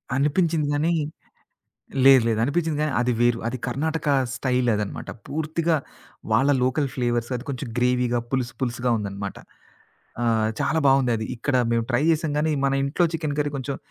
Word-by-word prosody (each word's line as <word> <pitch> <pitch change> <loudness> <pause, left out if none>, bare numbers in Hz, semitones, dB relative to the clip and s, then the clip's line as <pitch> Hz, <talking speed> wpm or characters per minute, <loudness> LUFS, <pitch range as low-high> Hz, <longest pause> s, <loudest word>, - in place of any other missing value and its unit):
అనిపించింది 150 +2 +1
గానీ 155 +4 +1 1.1
లేదు, 135 -2 +8
లేదు 110 -1 +1
అనిపించింది 155 +2 0
గానీ, 155 -1 0
అది 125 0 +1
వేరు. 120 -1 +3
అది 130 +2 -4
కర్ణాటక 150 +5 -2 0.3
స్టైలదన్నమాట. 125 -6 -1 0.2
పూర్తిగా 160 +2 0 0.6
వాళ్ళ 140 +2 +4
లోకల్ 135 +3 +1
ఫ్లేవర్స్ 120 -1 -1
అది 120 - -8
కొంచెం 135 -1 -5
గ్రేవీగా 125 0 +2
పులుసు, 130 -1 -1
పులుసుగా 125 -1 -1
ఉందన్నమాట. 100 -2 -5 0.9
ఆహ్, 110 -2 +2
చాలా 155 +1 +1
బావుందది. 125 -5 +2
ఇక్కడ 130 +3 0 0.2
మేము 115 -1 +1
ట్రై 120 +2 +2
చేసాం 155 -1 0
గానీ, 155 +1 +1
మన 135 - +2
ఇంట్లో 145 +6 +1
చికెన్ 155 -3 -2
కర్రీ 145 -1 0
కొంచెం, 135 +1 -4
135 Hz, 145 wpm, -24 LUFS, 120-150 Hz, 1.1 s, లేదు